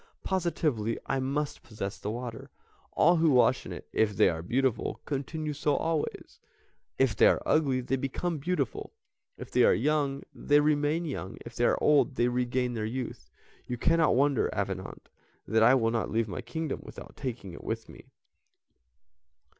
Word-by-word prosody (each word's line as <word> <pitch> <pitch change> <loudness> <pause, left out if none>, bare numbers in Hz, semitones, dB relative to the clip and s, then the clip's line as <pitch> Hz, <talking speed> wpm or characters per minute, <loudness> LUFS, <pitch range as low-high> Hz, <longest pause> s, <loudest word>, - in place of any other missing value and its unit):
Positively 155 - 0
I 135 - -1
must 140 +3 -2
possess 105 -3 -6
the 105 - -4
water; 115 0 -6 0.4
all 170 +2 +4
who 160 0 +4
wash 125 -1 +3
in - - -7
it, - - -8
if 105 -3 +1
they - - +6
are 80 -1 -3
beautiful, 125 +7 -1
continue 150 +2 -3
so 145 0 0
always, 160 0 -3 0.6
if 130 -5 +2
they - - +6
are - - +3
ugly 135 -5 +2
they 135 +2 -1
become 150 +5 -2
beautiful; 145 -4 -2 0.4
if - - -9
they - - +4
are - - +5
young 140 +4 0
they 145 0 +3
remain 150 +2 +1
young, 130 - -5
if 120 -1 -10
they 120 - +1
are - - +3
old 150 -2 +3
they 120 0 +2
regain 125 0 0
their 110 -2 -3
youth. 125 +3 -5 0.4
You 125 - -3
cannot 165 +3 +3
wonder, 140 0 +2
Avenant, - - -4 0.4
that 110 0 +2
I 125 +4 +7
will 115 -3 +2
not 115 -1 -1
leave 115 0 0
my 95 - -5
kingdom 150 +6 -4
without - - -11
taking 115 -9 -5
it - - -10
with 115 0 -4
me." - - -14
130 Hz, 170 wpm, -29 LUFS, 115-150 Hz, 0.6 s, I